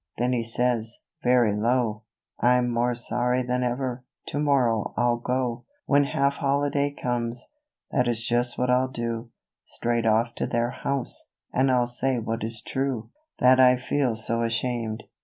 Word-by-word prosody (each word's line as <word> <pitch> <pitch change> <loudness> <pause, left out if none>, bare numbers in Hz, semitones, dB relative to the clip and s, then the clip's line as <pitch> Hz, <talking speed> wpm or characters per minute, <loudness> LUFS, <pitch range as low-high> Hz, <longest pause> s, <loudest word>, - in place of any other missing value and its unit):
Then 125 +2 +1
he 120 - +1
says, 115 0 -1 0.2
very 120 -4 +4
low 115 0 +1 0.2
" - - -67
I'm 125 +1 +3
more 120 +1 +1
sorry 125 +1 0
than 125 0 -1
ever, 125 0 -2 0.3
to 145 - -2
morrow 130 -7 +1
I'll 120 0 +2
go, 125 0 -2 0.2
When 145 0 +4
half 140 0 0
holiday 140 0 +1
comes, 120 -3 -3 0.4
that 125 -2 +2
is 115 -1 -1
just 120 +1 0
what 125 0 +1
I'll 130 +1 +3
do, 115 -2 -4 0.4
Straight 115 -1 -1
off 115 +2 +2
to - - -1
their 120 0 0
house, 140 -1 -3 0.2
and 130 +1 +3
I'll 125 -1 +3
say 125 +2 -1
what 115 0 -3
is 115 0 -3
true, 130 -4 -2 0.3
That 130 +1 +5
I 125 -1 +7
feel 125 -1 0
so 115 +1 -2
ashamed. 115 -1 -2
120 Hz, 160 wpm, -25 LUFS, 115-130 Hz, 0.4 s, I